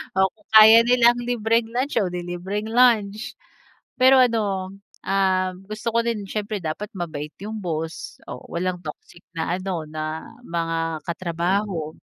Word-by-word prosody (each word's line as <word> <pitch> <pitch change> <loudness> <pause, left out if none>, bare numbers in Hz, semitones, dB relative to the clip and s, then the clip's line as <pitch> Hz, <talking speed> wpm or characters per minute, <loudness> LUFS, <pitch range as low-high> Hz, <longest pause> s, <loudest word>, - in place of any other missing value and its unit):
O 190 0 +3
kung 215 - -31
kaya 220 +1 +10
nilang 240 0 +5
libreng 230 -1 0
lunch, 265 +4 -1
o 195 - +1
'di 180 0 -4
libreng 190 +5 -4
lunch. 225 -3 +2 0.7
Pero 260 +1 +7
ano, 205 -6 +1 0.3
ah, 190 -1 +1 0.2
gusto 215 +2 -4
ko 230 - +3
din 230 -3 -2
siyempre 210 +1 -4
dapat 165 +6 -4
mabait 155 -4 -5
yung 215 +1 -5
boss 165 -3 -5
o 125 - -7
walang 180 +1 -2
toxic 155 +2 -10
na 170 +2 -1
ano, 185 -4 -3
na 155 +1 -5 0.2
mga 165 -2 -2
katrabaho. 170 0 -2
190 Hz, 145 wpm, -23 LUFS, 170-220 Hz, 0.7 s, kaya